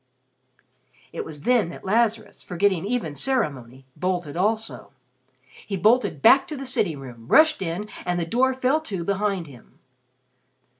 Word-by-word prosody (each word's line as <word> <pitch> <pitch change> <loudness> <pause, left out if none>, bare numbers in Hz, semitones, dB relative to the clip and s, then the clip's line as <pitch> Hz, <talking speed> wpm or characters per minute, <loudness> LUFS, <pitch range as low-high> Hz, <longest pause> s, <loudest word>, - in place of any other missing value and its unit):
It - - -4
was 150 -2 -10
then 240 -8 +2
that 170 - -11
Lazarus, 220 +1 0
forgetting 185 0 0
even 215 -9 -2
ceremony, 135 - -2
bolted 180 -5 -2
also. 215 +4 -1 0.6
He 195 +8 -6
bolted 215 - +2
back 275 +6 +6
to 305 -4 -6
the 270 - -6
sitting 195 - 0
room, 120 -4 -11
rushed 315 - +5
in, 185 +4 -3 0.2
and 175 0 -1
the 170 - -1
door 255 +8 +1
fell 260 +4 +1
to 195 - -4
behind 195 -1 -1
him. 130 -6 -16
195 Hz, 145 wpm, -24 LUFS, 165-240 Hz, 0.6 s, back